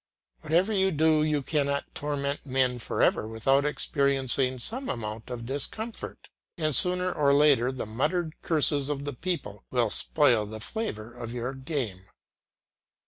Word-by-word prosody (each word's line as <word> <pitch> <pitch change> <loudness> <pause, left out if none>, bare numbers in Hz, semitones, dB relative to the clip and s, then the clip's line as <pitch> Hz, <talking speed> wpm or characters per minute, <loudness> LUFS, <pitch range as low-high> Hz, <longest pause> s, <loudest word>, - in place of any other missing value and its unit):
Whatever 180 - +1
you 190 -1 +3
do, 155 -2 +3
you 150 -2 +1
cannot 140 -1 -1
torment 145 -1 -3
men 130 -2 +1
for - - -1
ever 110 - +2
without 135 +5 +2
experiencing 135 -3 0
some 245 - -5
amount 110 0 -5
of 120 -2 -6
discomfort; 210 - -5 0.3
and 155 -3 0
sooner 180 +6 +5
or 140 -1 +3
later 140 -4 +4
the 130 -3 -5
muttered 155 - -1
curses 145 -3 +2
of 140 -1 -3
the 145 - -3
people 125 - -4
will 120 -4 +1
spoil 120 -9 +3
the 110 +1 -7
flavour 115 - -5
of 120 -1 -7
your 125 +2 -3
game. 130 - -4
140 Hz, 145 wpm, -27 LUFS, 120-155 Hz, 0.3 s, sooner